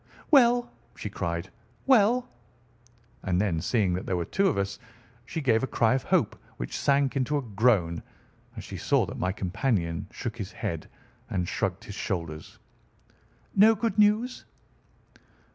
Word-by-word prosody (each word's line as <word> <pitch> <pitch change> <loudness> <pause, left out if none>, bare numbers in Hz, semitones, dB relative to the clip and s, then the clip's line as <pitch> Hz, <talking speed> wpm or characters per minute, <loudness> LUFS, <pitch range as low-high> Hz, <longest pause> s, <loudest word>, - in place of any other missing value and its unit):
"Well?" 245 -4 +5 0.2
she 105 - -6
cried, 85 0 -3 0.3
"well?" 245 -1 +4 0.9
And 90 -2 0
then, 95 -6 0
seeing 100 -2 +1
that 90 - -4
there 90 - 0
were 85 - -2
two 195 - +1
of 185 - +1
us, 100 0 -2 0.5
she 160 - -3
gave 115 -5 +3
a 135 - -1
cry 115 -2 +2
of 130 - +1
hope - - +1 0.2
which - - -5
sank 140 0 +2
into 135 +2 +1
a - - -1
groan 100 -7 +2 0.6
as - - -6
she - - -7
saw - - +2
that - - -7
my 90 - 0
companion 95 -3 -1
shook 115 -1 -5
his 100 -5 -5
head - - -4 0.4
and 90 -2 -1
shrugged - - -2
his - - -8
shoulders. 80 -4 -4 1.0
"No 215 +3 +7
good 220 -1 -1
news?" 215 +4 +3
115 Hz, 155 wpm, -27 LUFS, -, 1.0 s, No